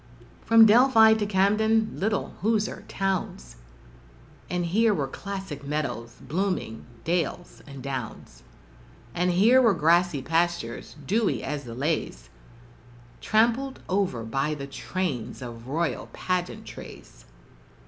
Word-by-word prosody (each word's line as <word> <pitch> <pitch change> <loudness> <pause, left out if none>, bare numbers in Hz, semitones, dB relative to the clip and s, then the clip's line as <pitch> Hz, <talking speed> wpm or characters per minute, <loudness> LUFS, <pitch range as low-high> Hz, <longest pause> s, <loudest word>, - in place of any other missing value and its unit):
From 225 0 +8
Delphi 225 0 +6
to 215 -2 -1
Camden 215 +3 +2
little 210 +1 -1
Hoosier 215 0 0
towns, 190 - -3 0.9
But 180 0 -1
here 210 +5 +2
were 140 -3 -1
classic 190 -3 -7
meadows, 140 -6 -3
blooming 180 - -2 0.2
dales 170 +1 -2
and 140 -2 -10
downs 125 - -6 0.7
And 180 +5 +1
here 220 +9 +5
were 225 -6 +4
grassy 165 -2 +2
pastures, 170 +3 -1
dewy 215 +6 0
as 145 -1 -4
the 115 -1 -8
leas 130 - -2 0.9
Trampled 235 +5 +1
over 185 - 0
by 135 +6 -1
the 140 -2 -6
trains 135 +1 -4
of 120 -1 -9
royal 165 +5 -2
pageantries. 175 - -5
175 Hz, 110 wpm, -26 LUFS, 140-210 Hz, 0.9 s, From